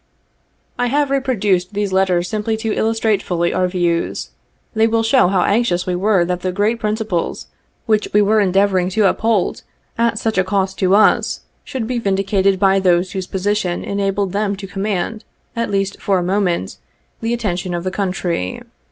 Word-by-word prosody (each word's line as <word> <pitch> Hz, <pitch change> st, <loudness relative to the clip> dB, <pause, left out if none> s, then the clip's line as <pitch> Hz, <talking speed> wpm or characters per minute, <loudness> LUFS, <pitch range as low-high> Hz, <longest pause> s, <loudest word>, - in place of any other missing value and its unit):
I 245 Hz, -, +2 dB
have 285 Hz, +2 st, +1 dB
reproduced 210 Hz, -9 st, 0 dB
these 205 Hz, -2 st, -1 dB
letters 185 Hz, -2 st, +2 dB
simply 215 Hz, +2 st, -2 dB
to 220 Hz, -1 st, -2 dB
illustrate 220 Hz, -1 st, +1 dB
fully 170 Hz, -1 st, -1 dB
our 185 Hz, -, +1 dB
views. 175 Hz, -2 st, -1 dB, 0.4 s
They 220 Hz, 0 st, +3 dB
will 225 Hz, 0 st, +1 dB
show 230 Hz, -1 st, +4 dB
how 185 Hz, -1 st, +2 dB
anxious 200 Hz, -5 st, +1 dB
we 180 Hz, -, -1 dB
were 190 Hz, -1 st, +2 dB
that 180 Hz, 0 st, -2 dB
the 185 Hz, +1 st, -2 dB
great 210 Hz, +5 st, 0 dB
principles 215 Hz, -5 st, -2 dB, 0.4 s
which 215 Hz, -2 st, +1 dB
we 210 Hz, -, +4 dB
were 210 Hz, +1 st, +3 dB
endeavoring 190 Hz, -2 st, +2 dB
to 215 Hz, -, +4 dB
uphold, 220 Hz, -1 st, 0 dB, 0.4 s
at 230 Hz, -1 st, +2 dB
such 220 Hz, -3 st, 0 dB
a -, -, +4 dB
cost 190 Hz, 0 st, -1 dB
to 190 Hz, +1 st, +3 dB
us, 215 Hz, -, +3 dB, 0.2 s
should 245 Hz, -4 st, -4 dB
he 250 Hz, 0 st, -1 dB
vindicated 195 Hz, -2 st, +1 dB
by 195 Hz, 0 st, +4 dB
those 180 Hz, -1 st, +2 dB
whose 190 Hz, -1 st, -4 dB
position 190 Hz, -2 st, -1 dB
enabled 200 Hz, -1 st, -1 dB
them 200 Hz, 0 st, -1 dB
to 195 Hz, 0 st, -8 dB
command, 200 Hz, +2 st, -3 dB, 0.3 s
at 230 Hz, 0 st, -1 dB
least 195 Hz, -1 st, -2 dB
for 195 Hz, -2 st, +1 dB
a 180 Hz, -, 0 dB
moment, 180 Hz, -, -1 dB, 0.4 s
the 225 Hz, -, -1 dB
attention 185 Hz, -6 st, -2 dB
of 170 Hz, -, -3 dB
the 185 Hz, -, -2 dB
country. 180 Hz, -, -2 dB
195 Hz, 175 wpm, -18 LUFS, 185-220 Hz, 0.4 s, show